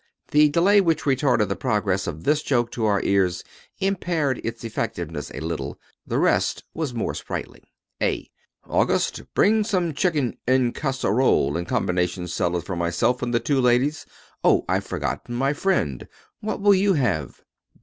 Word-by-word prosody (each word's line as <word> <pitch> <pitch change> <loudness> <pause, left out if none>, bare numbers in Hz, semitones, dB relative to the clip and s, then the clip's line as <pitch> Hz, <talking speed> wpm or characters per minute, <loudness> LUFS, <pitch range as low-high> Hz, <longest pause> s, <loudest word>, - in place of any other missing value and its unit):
The 150 0 +5
delay 190 +7 +4
which 165 -4 +1
retarded 130 -6 +2
the 100 - -2
progress 100 -3 0
of 80 +2 -5
this 150 +1 +2
joke 120 -5 0
to 115 - -2
our 100 -2 +2
ears 95 -3 +1 0.3
impaired 175 -8 -1
its 115 - -5
effectiveness 85 - -4
a 70 - -7
little. 80 -4 -4 0.3
The - - -1
rest - - +1
was 155 -5 -3
more 120 -2 -2
sprightly. - - -7 0.3
A - - 0 0.4
August, - - +1
bring 215 +1 +4
some 180 -6 0
chicken 150 -5 0
en 130 -1 +3
casserole 130 - +1
and 85 +1 -3
combination 90 0 -1
salad 90 -1 -1
for 95 - -4
myself 85 +9 0
and 125 -1 -2
the 120 - +2
two 130 +3 +1
ladies. 135 +5 +2 0.4
Oh, - - +4
I've - - 0
forgotten 120 - -3
my 135 +3 +1
friend. 145 - -1 0.3
What 215 -1 -4
will 205 0 +6
you 195 +1 +3
have? 95 - -1
125 Hz, 160 wpm, -23 LUFS, 90-150 Hz, 0.4 s, will